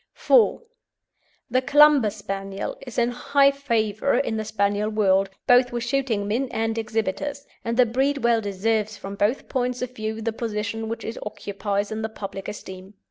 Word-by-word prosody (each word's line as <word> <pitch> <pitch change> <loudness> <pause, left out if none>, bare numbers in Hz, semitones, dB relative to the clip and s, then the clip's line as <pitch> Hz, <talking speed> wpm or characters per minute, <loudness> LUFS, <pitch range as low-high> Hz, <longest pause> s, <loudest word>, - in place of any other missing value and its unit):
IV. 485 0 +4 0.9
THE 255 +1 +3
CLUMBER 290 -3 +6
SPANIEL 195 -1 -5
is 245 - -8
in 240 0 +3
high 275 +3 +3
favour 235 -3 0
in 230 -5 0
the 220 - -2
Spaniel 205 0 0
world, 195 -2 +2 0.2
both 245 0 +5
with 240 -1 -3
shooting 245 -5 0
men 245 +5 -1
and 225 -1 -1
exhibitors, 225 +6 -2 0.2
and 230 0 -2
the 250 - +6
breed 270 +4 0
well 235 -1 +3
deserves 210 +1 -1
from 195 - -7
both 205 +6 0
points 250 -1 -1
of 250 0 -6
view 220 0 -4
the 225 0 -2
position 220 -1 -3
which 230 - -5
it 225 - -5
occupies 205 0 -3
in 220 0 -3
the 220 - -2
public 195 -3 -7
esteem. 190 -1 -9
225 Hz, 170 wpm, -24 LUFS, 205-250 Hz, 0.9 s, CLUMBER